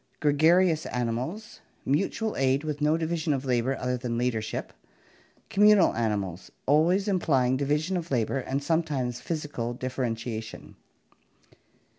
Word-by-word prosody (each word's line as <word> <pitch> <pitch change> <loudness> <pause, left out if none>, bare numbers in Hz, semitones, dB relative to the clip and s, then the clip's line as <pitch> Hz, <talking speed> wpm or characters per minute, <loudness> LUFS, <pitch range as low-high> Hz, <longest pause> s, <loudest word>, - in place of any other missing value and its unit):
Gregarious 160 +3 +3
animals. 125 - -3 0.3
Mutual 195 +9 0
aid 135 +2 +1
with 150 -1 -4
no 150 +2 +3
division 160 -1 -1
of 135 0 -3
labor 125 +1 0
other 125 0 -1
than 120 -1 -3
leadership. 115 -3 -2 0.7
Communal 205 -2 +5
animals. 100 -6 -2 0.2
Always 170 +8 +3
implying 135 -10 +2
division 150 +6 0
of 170 -2 -3
labor 125 +1 0
and 135 +2 -3
sometimes 140 -7 -1
physical 145 -6 -4
differentiation. 120 -3 -4
140 Hz, 115 wpm, -27 LUFS, 125-160 Hz, 0.7 s, Communal